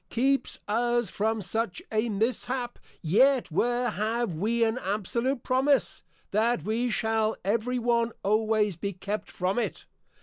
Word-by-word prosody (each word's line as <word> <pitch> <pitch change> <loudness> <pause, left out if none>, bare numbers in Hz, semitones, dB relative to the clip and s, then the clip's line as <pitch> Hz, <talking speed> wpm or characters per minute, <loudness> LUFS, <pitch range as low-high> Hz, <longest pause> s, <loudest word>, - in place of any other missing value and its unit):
] - - -46
keeps 270 +3 +1
us 240 0 +1
from 220 0 -1
such 195 0 -2
a 220 +2 +1
Mishap; 245 +3 -2 0.2
yet 245 - +3
where 240 +7 +1
have 220 0 -1
we 225 +8 +1
an 225 +2 +1
Absolute 235 +6 -1
Promise, 270 +2 +2 0.3
that 230 +4 +1
we 230 +4 0
shall 220 -1 +1
every 230 +5 0
one 235 -1 +1
always 215 -2 +2
be 200 +3 -3
kept 200 +3 -4
from 190 +4 -1
it? - - -3
225 Hz, 140 wpm, -27 LUFS, 210-240 Hz, 0.3 s, yet